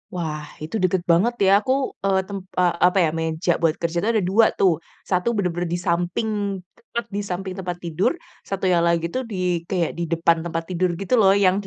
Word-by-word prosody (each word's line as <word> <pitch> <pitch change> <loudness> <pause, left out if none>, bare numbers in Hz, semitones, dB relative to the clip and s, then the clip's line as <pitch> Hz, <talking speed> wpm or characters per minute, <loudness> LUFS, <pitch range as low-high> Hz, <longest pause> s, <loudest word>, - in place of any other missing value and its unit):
Wah 155 -3 -3 0.2
itu 160 +8 -5
deket 185 -1 +1
banget 210 +9 +3
ya. - - +5
Aku, 255 +5 -2 0.3
eee, 190 -1 +3
tem 200 -1 -5 0.2
eee, 180 -1 +3
apa 180 - 0
ya, 160 - +3
meja 160 +2 0
buat 165 -1 +2
kerja 170 0 -1
itu 215 - 0
ada 215 -4 +2
2 220 +3 +5
tuh. 190 -3 +5 0.4
1 180 +3 +1
bener-bener 175 -3 -1
di - - -3
samping, 175 +6 0 0.5
tepat 235 0 -5
di - - 0
samping 185 +1 -3
tempat 180 -2 -4
tidur. 170 +3 +1 0.4
Satunya 185 -3 +1
lagi 170 -1 +1
tuh 260 - 0
di - - -4 0.3
kayak 175 -4 0
di - - 0
depan 165 0 +3
tempat 165 0 -3
tidur 180 0 +1
gitu 195 - -2
loh. 195 -2 +6
Yang 185 0 +4
180 Hz, 200 wpm, -22 LUFS, 170-195 Hz, 0.5 s, loh